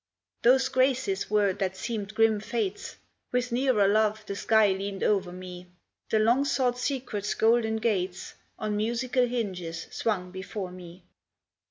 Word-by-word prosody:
Those 260 +2 +5
Graces 260 -7 +1
were 205 -2 +3
that 190 0 -3
seemed 215 -3 -4
grim 225 -1 +3
Fates; 210 -2 -3 0.4
With 250 0 0
nearer 240 -5 +3
love 215 +1 +2
the 200 - -5
sky 215 0 +4
leaned 195 0 -3
o'er 195 -4 +1
me; 180 0 -9 0.4
The 220 - +2
long 235 +5 +3
sought 250 -3 0
Secret's 245 -7 -2
golden 225 0 +3
gates 190 -5 -2 0.2
On 215 -1 -2
musical 240 +4 +1
hinges 185 -9 -4
swung 185 -5 -2
before 190 0 -6
me. 180 0 -12
215 Hz, 140 wpm, -27 LUFS, 190-240 Hz, 0.4 s, Those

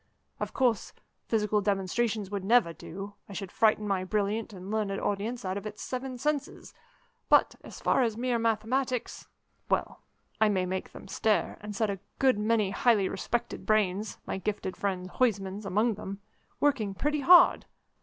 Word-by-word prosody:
Of - - -3
course, 245 -5 +1 0.3
physical 210 -2 +1
demonstrations 205 +1 0
would 200 -2 -3
never 215 -4 +4
do: 195 +5 -8 0.2
I - - -8
should 195 -1 -5
frighten 215 -1 +2
my 195 -2 0
brilliant 210 +3 -1
and 190 0 -8
learned 210 -3 -1
audience 210 +3 -2
out 185 +1 -2
of 200 +1 -5
its 210 0 -8
seven 255 0 -4
senses; 290 +2 -3 0.6
but, - - +5
as - - -10
for 265 - +3
mere 245 -1 0
mathematics 230 +3 -1 0.4
well, - - -1 0.4
I 220 - +5
may 190 -3 +1
make 185 +1 -4
them - - -11
stare, 210 +2 0
and 210 0 -6
set 215 0 +1
a 195 - -5 0.2
good 260 -5 +3
many 215 -2 +2
highly 205 -2 +3
respected 235 +5 -3
brains 210 -1 +1
my - - -3
gifted 195 -2 -3
friend 185 -2 -2
Huysman's, 200 -2 -1
among 215 +5 +2
them 195 0 -7 0.4
working 225 -9 +1
pretty 295 +7 0
hard. 350 +5 +6
210 Hz, 160 wpm, -29 LUFS, 195-235 Hz, 0.6 s, hard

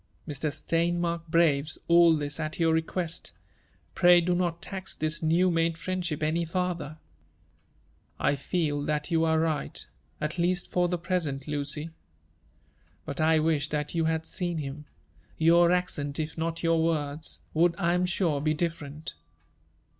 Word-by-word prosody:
Mr. 150 0 -2
Steinmark 170 +2 -1
braves 155 -3 +2
all 170 -1 +6
this 145 0 -3
at 155 -1 -3
your 165 -1 +3
request; 160 +1 -2 0.3
— - - -37
pray 175 -1 +6
do 175 +1 +1
not 175 -1 0
tax 190 0 -5
this 155 +1 -1
new 170 +3 +3
made 165 0 +1
friendship 175 -3 -3
any 160 +3 +1
farther/' 170 -3 -3 1.2
"1 145 - +2
feel 145 0 -1
that 150 +2 -2
you 165 -1 +3
are 160 -1 +3
right 160 -3 -1 0.2
— - - -38
at 155 +4 -3
least 175 +1 0
for 180 0 +2
the 180 0 -1
present, 165 -6 -2
Lucy. 150 +2 -3 1.1
But 140 +2 -4
I 160 0 +4
wish 155 -1 +1
thiat 150 -1 -2
you 165 -1 +1
had 160 0 0
seen 175 -1 -2
htm: 145 0 -5 0.5
your 170 +2 +5
accent, 150 -6 -1
if 155 0 -3
not 165 +1 -3
your 165 -1 +3
words, 155 -2 -2
would, 170 +1 +3
I 170 -3 +1
am 180 +1 +1
sure, 170 -5 0
be 155 +1 +1
different." 155 -2 -4
165 Hz, 155 wpm, -28 LUFS, 150-170 Hz, 1.2 s, all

